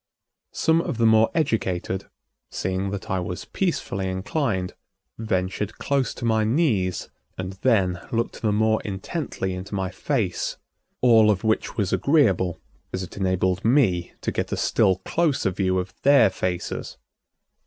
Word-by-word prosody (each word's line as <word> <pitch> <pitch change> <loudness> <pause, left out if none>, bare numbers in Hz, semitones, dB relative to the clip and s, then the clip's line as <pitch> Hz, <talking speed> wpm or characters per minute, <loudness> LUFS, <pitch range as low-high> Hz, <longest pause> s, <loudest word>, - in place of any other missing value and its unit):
Some 160 +1 +3
of 130 - -4
the 115 - +2
more 110 0 +5
educated, 95 - -1 0.4
seeing 95 +1 -2
that 100 -1 -5
I 95 - +1
was 90 0 -5
peacefully 100 - -2
inclined, 95 - -1 0.5
ventured 100 -1 -2
close 140 -2 0
to 120 - -5
my 110 -1 +2
knees 110 - +1 0.3
and 95 0 -4
then 95 -8 +2
looked 115 0 -2
the 110 -3 +1
more 110 +1 +2
intently 95 - -4
into 90 +2 -6
my 95 -1 -2
face, 110 -8 -2 0.4
all 115 -3 +6
of 100 -3 +1
which 110 0 0
was 100 -4 0
agreeable, 100 - +2 0.3
as 95 - -3
it 90 - -9
enabled 95 -1 0
me 110 -9 +2
to - - -1
get - - -3
a - - -1
still 95 - +3
closer 155 - +1
view 95 0 0
of 90 0 -3
their 135 -7 +6
faces. 90 -1 -3
100 Hz, 145 wpm, -24 LUFS, 95-115 Hz, 0.5 s, all